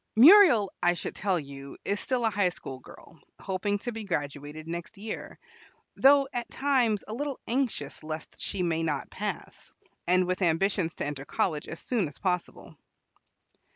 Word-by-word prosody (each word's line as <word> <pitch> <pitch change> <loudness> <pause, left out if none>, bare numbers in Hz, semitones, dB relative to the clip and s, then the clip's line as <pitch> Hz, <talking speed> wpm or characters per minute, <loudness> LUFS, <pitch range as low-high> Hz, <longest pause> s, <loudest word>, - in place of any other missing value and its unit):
Muriel, 265 - +8
I 175 0 +3
should - - -4
tell 190 -3 0
you, 140 -1 -9
is 200 +1 0
still 250 -2 0
a 225 - +2
high 200 -2 +2
school 135 -6 -8
girl, 160 +4 -15 0.2
hoping 195 +2 -1
to 240 +4 -4
be 225 -1 -6
graduated 150 -3 -4
next 170 +5 -6
year, 215 +2 -6 0.6
though 275 0 +6
at 240 -1 -3
times 250 -7 +1
a 215 - -5
little 280 +2 -3
anxious 235 - -2
lest 155 0 -7
she 185 - -2
may 165 -2 0
not 150 -5 -2
pass, - - -6 0.4
and 180 +1 +4
with 185 +2 -2
ambitions 175 0 +1
to - - -3
enter 145 -2 -4
college 150 +1 -1
as - - -6
soon 225 -9 0
as 145 - -11
possible. 180 -2 -3
185 Hz, 165 wpm, -28 LUFS, 160-225 Hz, 0.6 s, Muriel